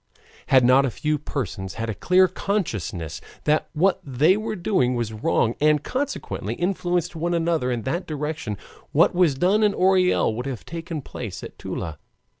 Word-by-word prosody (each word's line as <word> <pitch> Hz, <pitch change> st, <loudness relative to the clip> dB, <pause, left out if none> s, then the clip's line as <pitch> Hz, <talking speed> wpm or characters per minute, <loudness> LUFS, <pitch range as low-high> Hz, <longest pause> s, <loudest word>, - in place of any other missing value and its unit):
Had 130 Hz, -2 st, +5 dB
not 130 Hz, +2 st, +6 dB
a 135 Hz, -, +1 dB
few 150 Hz, +5 st, -1 dB
persons 100 Hz, -, -4 dB
had 115 Hz, 0 st, -3 dB
a 110 Hz, -, -2 dB
clear 185 Hz, -, +4 dB
consciousness 115 Hz, -, -3 dB, 0.2 s
that 150 Hz, +1 st, +1 dB
what 180 Hz, +4 st, +2 dB
they 145 Hz, +7 st, +3 dB
were 215 Hz, +1 st, -3 dB
doing 170 Hz, -10 st, +1 dB
was 115 Hz, -2 st, -2 dB
wrong, 110 Hz, +1 st, +1 dB
and 150 Hz, -1 st, +4 dB
consequently 285 Hz, +2 st, -3 dB
influenced 175 Hz, -2 st, -1 dB
one 170 Hz, +2 st, -1 dB
another 165 Hz, -6 st, +1 dB
in 120 Hz, -2 st, -2 dB
that 170 Hz, +7 st, -2 dB
direction, 150 Hz, -8 st, -3 dB, 0.4 s
what -, -, +5 dB
was 175 Hz, -6 st, +3 dB
done 190 Hz, +9 st, +2 dB
at 210 Hz, -2 st, +3 dB
Orel 185 Hz, -9 st, +3 dB
would 125 Hz, +4 st, -4 dB
have 130 Hz, -5 st, -5 dB
taken 165 Hz, -2 st, -5 dB
place 110 Hz, -7 st, -7 dB
at -, -, -9 dB
Toula. 80 Hz, -3 st, -5 dB
155 Hz, 170 wpm, -24 LUFS, 125-180 Hz, 0.4 s, not